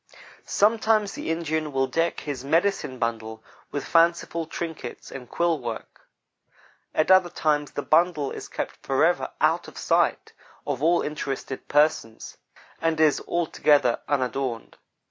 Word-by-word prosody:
Sometimes 215 Hz, -1 st, +2 dB
the -, -, -5 dB
Indian 160 Hz, -2 st, -1 dB
will 135 Hz, -1 st, +1 dB
deck 165 Hz, +5 st, -1 dB
his 140 Hz, -4 st, -5 dB
"medicine 165 Hz, -2 st, 0 dB
bundle" 110 Hz, -1 st, -3 dB, 0.3 s
with 145 Hz, -, -4 dB
fanciful 170 Hz, -1 st, +2 dB
trinkets 160 Hz, -7 st, -6 dB
and 125 Hz, -3 st, -9 dB
quill 170 Hz, -2 st, +1 dB
work 115 Hz, -3 st, -7 dB, 0.9 s
At 155 Hz, +4 st, +2 dB
other 185 Hz, -2 st, +6 dB
times 150 Hz, -3 st, 0 dB
the 145 Hz, -, -3 dB
"bundle" 155 Hz, -3 st, +2 dB
is -, -, -7 dB
kept -, -, -5 dB
forever -, -, +1 dB
out -, -, +2 dB
of -, -, -12 dB
the -, -, -8 dB
sight -, -, +1 dB, 0.3 s
of 140 Hz, -2 st, -3 dB
all 170 Hz, +3 st, +3 dB
uninterested 135 Hz, -3 st, -5 dB
persons, 145 Hz, -7 st, +1 dB, 0.4 s
and 165 Hz, -1 st, 0 dB
is 155 Hz, -2 st, +4 dB
altogether 150 Hz, -6 st, +2 dB
unadorned. 130 Hz, -3 st, -2 dB
155 Hz, 135 wpm, -25 LUFS, 135-170 Hz, 0.9 s, other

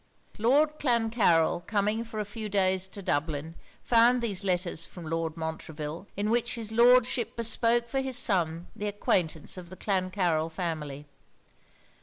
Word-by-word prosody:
Lord 290 Hz, +7 st, +3 dB
Clancarryl 225 Hz, -, +2 dB
coming 210 Hz, +2 st, 0 dB
for 225 Hz, -1 st, -7 dB
a 210 Hz, -, -1 dB
few 215 Hz, +1 st, -6 dB
days 190 Hz, -1 st, +1 dB
to 195 Hz, +1 st, -9 dB
Dublin, 155 Hz, 0 st, -2 dB, 0.3 s
found 240 Hz, +1 st, +4 dB
there 225 Hz, -3 st, -1 dB
letters 180 Hz, -3 st, -1 dB
from 175 Hz, 0 st, -9 dB
Lord 165 Hz, 0 st, -2 dB
Montreville, 160 Hz, +1 st, -5 dB
in 210 Hz, +2 st, 0 dB
which 240 Hz, 0 st, +1 dB
his 225 Hz, -2 st, -5 dB
Lordship 240 Hz, +1 st, +4 dB
bespoke 230 Hz, +1 st, +1 dB
for 270 Hz, +3 st, -1 dB
his 265 Hz, -2 st, -1 dB
son 175 Hz, -8 st, +1 dB
the 210 Hz, -, -3 dB
acquaintance 180 Hz, -5 st, -1 dB
of 175 Hz, -2 st, -9 dB
the 185 Hz, -, -11 dB
Clancarryl 185 Hz, -5 st, 0 dB
family. 155 Hz, -4 st, -4 dB
200 Hz, 145 wpm, -28 LUFS, 165-230 Hz, 0.3 s, found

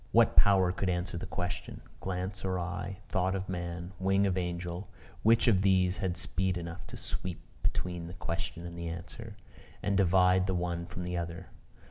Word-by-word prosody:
What -, -, +5 dB
power 95 Hz, -3 st, +6 dB
could 95 Hz, +1 st, -1 dB
answer 90 Hz, 0 st, -1 dB
the 85 Hz, -, -4 dB
question? 90 Hz, 0 st, -4 dB, 0.2 s
Glance 95 Hz, +1 st, -3 dB
of 95 Hz, -1 st, 0 dB
eye, 90 Hz, +2 st, -3 dB
thought 95 Hz, -1 st, +1 dB
of 95 Hz, 0 st, -3 dB
man, 85 Hz, -1 st, -4 dB
wing 95 Hz, +1 st, +3 dB
of 95 Hz, -2 st, +2 dB
angel, 90 Hz, +1 st, -3 dB, 0.3 s
which 115 Hz, +2 st, +5 dB
of 100 Hz, -5 st, +5 dB
these 95 Hz, -1 st, +4 dB
had 95 Hz, -4 st, -1 dB
speed 95 Hz, 0 st, 0 dB
enough 85 Hz, +1 st, -6 dB
to -, -, -8 dB
sweep 85 Hz, +9 st, -4 dB, 0.2 s
between 90 Hz, -2 st, -1 dB
the 90 Hz, -, -8 dB
question 85 Hz, -1 st, -4 dB
and 85 Hz, 0 st, -6 dB
the 85 Hz, 0 st, -4 dB
answer, 105 Hz, +6 st, -7 dB, 0.5 s
and 100 Hz, -, +2 dB
divide 95 Hz, -1 st, +5 dB
the 95 Hz, -, +1 dB
one 85 Hz, -1 st, -1 dB
from 90 Hz, 0 st, -5 dB
the 90 Hz, 0 st, -2 dB
other? 85 Hz, 0 st, -4 dB
90 Hz, 180 wpm, -31 LUFS, 85-95 Hz, 0.5 s, power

